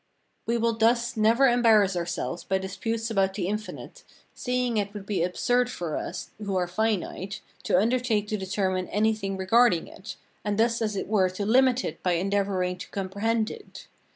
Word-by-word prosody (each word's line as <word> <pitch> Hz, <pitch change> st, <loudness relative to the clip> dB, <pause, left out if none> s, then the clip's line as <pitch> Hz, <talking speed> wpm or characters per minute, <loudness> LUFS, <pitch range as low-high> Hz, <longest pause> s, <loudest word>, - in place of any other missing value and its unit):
We 235 Hz, +1 st, +1 dB
will 230 Hz, 0 st, +1 dB
thus 235 Hz, +1 st, +2 dB
never 230 Hz, +5 st, +4 dB
embarrass 225 Hz, -6 st, +4 dB
ourselves 175 Hz, 0 st, -3 dB
by 190 Hz, -, 0 dB
disputes 225 Hz, +4 st, -3 dB
about 195 Hz, -2 st, +1 dB
the 180 Hz, -4 st, -2 dB
infinite, 215 Hz, -, -6 dB, 0.3 s
seeing 250 Hz, -2 st, -1 dB
it 205 Hz, 0 st, -2 dB
would 200 Hz, -2 st, -7 dB
be 195 Hz, -4 st, -1 dB
absurd 245 Hz, +8 st, +1 dB
for 170 Hz, -9 st, -4 dB
us 175 Hz, 0 st, -5 dB
who 200 Hz, -2 st, -2 dB
are 180 Hz, -1 st, +1 dB
finite 195 Hz, 0 st, -2 dB, 0.2 s
to -, -, +3 dB
undertake 225 Hz, 0 st, +1 dB
to 215 Hz, -, 0 dB
determine 190 Hz, -1 st, -1 dB
anything 210 Hz, -2 st, 0 dB
regarding 190 Hz, -2 st, +3 dB
it, 200 Hz, +2 st, -9 dB, 0.3 s
and 205 Hz, -1 st, -1 dB
thus 230 Hz, +1 st, +2 dB
as 215 Hz, -2 st, -1 dB
it -, -, -3 dB
were 195 Hz, -3 st, +3 dB
to 185 Hz, +2 st, -4 dB
limit 255 Hz, +3 st, +3 dB
it 160 Hz, -, -5 dB
by 180 Hz, -, +1 dB
endeavouring 185 Hz, 0 st, 0 dB
to -, -, -8 dB
comprehend 210 Hz, +4 st, -1 dB
it. 440 Hz, -, -11 dB
205 Hz, 175 wpm, -26 LUFS, 190-230 Hz, 0.3 s, never